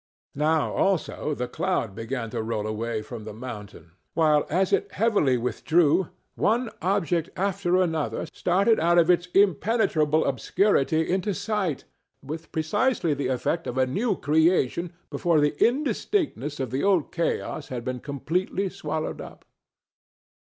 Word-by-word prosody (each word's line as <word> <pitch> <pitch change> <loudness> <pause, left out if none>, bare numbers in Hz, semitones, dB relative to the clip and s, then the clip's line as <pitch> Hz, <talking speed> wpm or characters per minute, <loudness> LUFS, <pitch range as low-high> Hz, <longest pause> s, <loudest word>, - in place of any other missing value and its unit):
Now, 155 +1 +1
also, 170 -5 0
the 125 -1 -3
cloud 125 - -1
began 115 +2 -4
to - - -2
roll 110 -1 -2
away 110 +1 -3
from 110 0 -8
the 105 -1 -8
mountain, 105 -8 -9 0.2
while, 155 -2 +3
as 185 +4 +1
it - - 0
heavily 200 - +2
withdrew, 155 +7 +2 0.2
one 230 +1 +1
object 175 -4 0
after 190 -2 +1
another 160 -4 -1
started 200 +6 +2
out 170 +2 +3
of 170 +1 +6
its 175 0 +1
impenetrable 185 -5 +3
obscurity 160 - +1
into 190 +2 0
sight 200 -7 -2 0.4
with 160 +4 -7
precisely 175 - +1
the 140 -2 -2
effect 130 +6 -1
of 125 - -4
a 130 - +4
new 200 - 0
creation 160 +1 +2 0.2
before 170 -3 +2
the 145 0 +2
indistinctness 260 - 0
of 130 -4 -3
the 130 +2 -1
old 190 -7 +2
chaos 165 -3 -2
had 120 -2 -5
been 130 0 -3
completely 180 +8 -2
swallowed 155 -4 -4
up. - - -11
160 Hz, 140 wpm, -25 LUFS, 130-190 Hz, 0.4 s, of